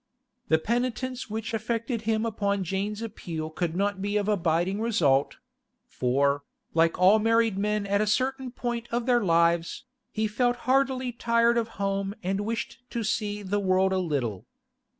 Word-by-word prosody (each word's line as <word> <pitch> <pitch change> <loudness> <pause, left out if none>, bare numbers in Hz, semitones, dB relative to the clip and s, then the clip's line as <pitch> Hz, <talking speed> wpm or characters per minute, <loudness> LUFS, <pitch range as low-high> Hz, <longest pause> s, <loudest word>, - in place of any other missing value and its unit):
The 160 - +4
penitence 245 +5 -2
which 220 +1 -4
affected 230 +1 -2
him 220 0 +1
upon 200 -3 -1
Jane's 200 +4 -3
appeal 165 -8 -5
could 170 0 -2
not 200 +1 0
be 205 +1 0
of 205 -1 -1
abiding 185 0 +1
result; 150 -12 +2 0.5
for, 140 +3 +1 0.3
like 165 0 +3
all 190 +4 +6
married 225 -1 +3
men 210 +1 0
at 200 +1 +1
a 215 - +1
certain 265 +4 0
point 240 -1 -4
of 235 0 -1
their 245 -2 +3
lives, 170 +2 +2 0.3
he 220 0 -1
felt 245 +3 +1
heartily 260 -1 +2
tired 235 0 +2
of 230 -1 +1
home 195 0 -1
and 195 +2 -1
wished 225 +2 -4
to 235 -2 -3
see 210 -1 -2
the 200 +2 -1
world 190 0 +2
a 190 - +1
little. 130 - -2
210 Hz, 160 wpm, -27 LUFS, 185-230 Hz, 0.5 s, all